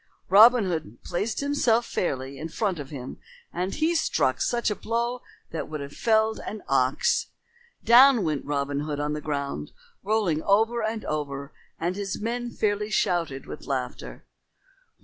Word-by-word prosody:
Robin 220 Hz, +4 st, +7 dB
Hood 160 Hz, -, -3 dB
placed 205 Hz, +8 st, -2 dB
himself 260 Hz, -5 st, +2 dB
fairly 135 Hz, -, -3 dB
in 160 Hz, -, -5 dB
front 190 Hz, -1 st, -1 dB
of 140 Hz, -2 st, -7 dB
him 130 Hz, -4 st, -8 dB, 0.3 s
and 180 Hz, +2 st, -2 dB
he 315 Hz, +2 st, +1 dB
struck 330 Hz, -, +1 dB, 0.3 s
a 210 Hz, -, +1 dB
blow 235 Hz, +3 st, -2 dB, 0.3 s
that 160 Hz, -, -4 dB
would 155 Hz, -1 st, -4 dB
have 140 Hz, 0 st, -7 dB
felled 220 Hz, -1 st, +2 dB
an 215 Hz, 0 st, -7 dB
ox. 130 Hz, -1 st, +2 dB, 0.6 s
Down 245 Hz, 0 st, +7 dB
went 155 Hz, -4 st, -1 dB
Robin 140 Hz, 0 st, -2 dB
Hood 150 Hz, 0 st, -3 dB
on 150 Hz, 0 st, -1 dB
the 150 Hz, -, -4 dB
ground 140 Hz, -, -4 dB, 0.3 s
rolling 200 Hz, -7 st, +1 dB
over 225 Hz, +5 st, +2 dB
and 220 Hz, 0 st, -3 dB
over, 140 Hz, -2 st, -4 dB, 0.3 s
and 175 Hz, +3 st, -1 dB
his 200 Hz, -1 st, -4 dB
men 240 Hz, +2 st, -3 dB
fairly 210 Hz, -2 st, -1 dB
shouted 170 Hz, -9 st, 0 dB
with -, -, -9 dB
laughter. 130 Hz, -3 st, -4 dB
180 Hz, 150 wpm, -26 LUFS, 145-225 Hz, 0.6 s, Robin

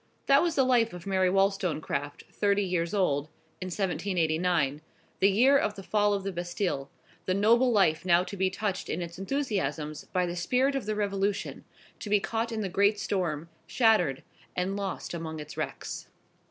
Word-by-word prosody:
That 275 Hz, 0 st, +5 dB
was 340 Hz, -2 st, 0 dB
the 270 Hz, -, +4 dB
life 240 Hz, -4 st, +3 dB
of 180 Hz, -1 st, -9 dB
Mary 190 Hz, -2 st, +2 dB
Wollstonecraft, 180 Hz, -7 st, 0 dB
thirty 205 Hz, 0 st, +1 dB
years 175 Hz, -3 st, -1 dB
old, 150 Hz, -8 st, +1 dB, 0.4 s
in 185 Hz, -, -3 dB
1789, 175 Hz, -5 st, 0 dB, 0.4 s
the 195 Hz, -, +5 dB
year 250 Hz, +8 st, +5 dB
of 210 Hz, -, -1 dB
the 195 Hz, -, -9 dB
Fall 205 Hz, +1 st, +2 dB
of 195 Hz, -, -3 dB
the 195 Hz, -, -2 dB
Bastille; 175 Hz, -5 st, -3 dB, 0.4 s
the 185 Hz, -, +2 dB
noble 235 Hz, +5 st, +4 dB
life 180 Hz, -7 st, +3 dB
now 175 Hz, -1 st, +4 dB
to 200 Hz, -, -7 dB
be 190 Hz, -1 st, +1 dB
touched 195 Hz, 0 st, -3 dB
in 175 Hz, -, -2 dB
its 170 Hz, +1 st, -8 dB
enthusiasms 190 Hz, -, -2 dB
by 180 Hz, -1 st, 0 dB
the 175 Hz, 0 st, -4 dB
spirit 250 Hz, +11 st, +1 dB
of 270 Hz, -6 st, -3 dB
the 215 Hz, -, 0 dB
Revolution, 200 Hz, -1 st, -2 dB, 0.3 s
to 210 Hz, -, -6 dB
be 210 Hz, 0 st, +4 dB
caught 230 Hz, +3 st, -2 dB
in 220 Hz, -1 st, -2 dB
the 200 Hz, -, -1 dB
great 200 Hz, +3 st, +2 dB
storm, 170 Hz, -7 st, -2 dB, 0.2 s
shattered, 215 Hz, -, +2 dB, 0.3 s
and 185 Hz, +2 st, -1 dB
lost 200 Hz, -3 st, -4 dB
among 160 Hz, -2 st, -5 dB
its 150 Hz, 0 st, -8 dB
wrecks. -, -, -5 dB
190 Hz, 180 wpm, -28 LUFS, 170-210 Hz, 0.4 s, That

